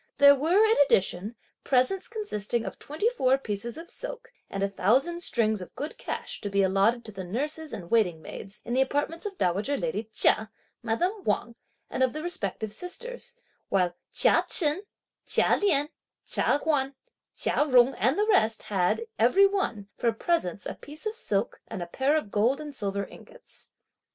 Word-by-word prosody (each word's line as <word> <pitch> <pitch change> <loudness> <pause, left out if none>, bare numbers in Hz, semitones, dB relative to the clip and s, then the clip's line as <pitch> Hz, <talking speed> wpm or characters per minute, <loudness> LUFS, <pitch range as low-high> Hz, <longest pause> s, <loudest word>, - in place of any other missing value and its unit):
There 280 0 +9
were, 335 +10 +4
in 440 +1 +3
addition, 205 -5 +2 0.3
presents 260 +9 +1
consisting 240 - -3
of - - -6
twenty 310 +10 -2
four 265 - +3
pieces 230 0 -5
of 335 +1 -9
silk - - -7 0.2
and 195 - -3
a - - +3
thousand 260 - +1
strings 220 - +1
of 180 - -10
good 295 - -5
cash - - -5
to 205 - -3
be 200 0 +2
allotted 195 +5 +2
to 215 - -8
the 195 -2 -6
nurses, 295 - -3
and 175 -3 -7
waiting 195 -8 +3
maids, 195 +5 -9
in 240 - -3
the 260 - +3
apartments 290 +7 -1
of 395 -2 -8
dowager 205 - 0
lady 450 - -3
Chia, 215 0 +3 0.3
madame 355 - -1
Wang 240 -7 -1 0.3
and - - -4
of 260 -2 +3
the 310 +1 -5
respective 220 - -3
sisters; 485 - -7 0.3
while 180 -3 +2 0.2
Chia - - +4
Chen, 310 +1 +3 0.5
Chia - - +4
Lien, 300 -8 +2 0.4
Chia - - +2
Huan, 275 -3 +1 0.4
Chia - - +2
Jung 255 0 +6
and 255 - +1
the 420 - +3
rest 375 - +2
had, 195 - 0
every 395 0 +6
one, 385 - -1
for 235 - +2
presents, 220 - -1
a - - -3
piece 300 +6 -12
of 430 - -1
silk, 210 - -2
and 180 - -5
a - - -5
pair 270 - +1
of 210 -10 -4
gold 235 +7 +2
and 300 -1 -7
silver 200 -2 -2
ingots. - - -13
260 Hz, 175 wpm, -27 LUFS, 205-335 Hz, 0.5 s, There